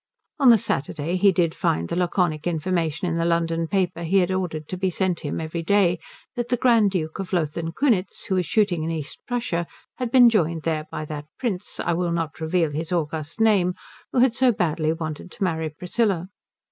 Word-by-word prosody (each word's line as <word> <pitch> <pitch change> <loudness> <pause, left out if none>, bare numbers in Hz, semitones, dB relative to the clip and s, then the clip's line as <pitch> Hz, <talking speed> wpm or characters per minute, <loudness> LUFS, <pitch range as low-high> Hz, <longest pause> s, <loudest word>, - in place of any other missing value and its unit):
On 270 -3 +6
the 230 - +8
Saturday 155 -1 -2
he 195 +2 +5
did 170 -3 +1
find 85 +1 0
the - - -3
laconic 175 -3 0
information 165 0 -1
in 170 - -1
the 165 0 0
London 165 -1 0
paper 180 -2 0
he 170 +4 +1
had 185 -1 +3
ordered 170 -5 -2
to - - -3
be 190 +1 0
sent 180 -1 -1
him 145 - -4
every 160 +1 -4
day 180 -1 +3 0.4
that 240 -1 -3
the 245 - +2
Grand 230 -4 +4
Duke 160 -4 -3
of 190 -1 -4
Lothen 165 -1 -1
Kunitz 215 -4 0
who - - -2
was 180 -3 +1
shooting 200 -7 +2
in 160 - -2
East 155 -2 -5
Prussia 180 -9 -1 0.3
had 250 -2 -2
been 245 0 +7
joined 170 -8 +1
there 155 -2 -1
by 155 - -5
that 150 -1 -6
Prince 210 -8 -3
I 170 - 0
will 175 0 0
not 165 -2 -3
reveal 160 -1 +1
his 160 +3 -4
august 160 0 -2
name 200 -5 +3 0.4
who - - -3
had 255 -2 +4
so 260 0 +4
badly 160 -6 0
wanted 160 +1 -5
to 205 - -4
marry 160 -3 -1
Priscilla. 180 +3 -1
175 Hz, 205 wpm, -24 LUFS, 160-195 Hz, 0.4 s, the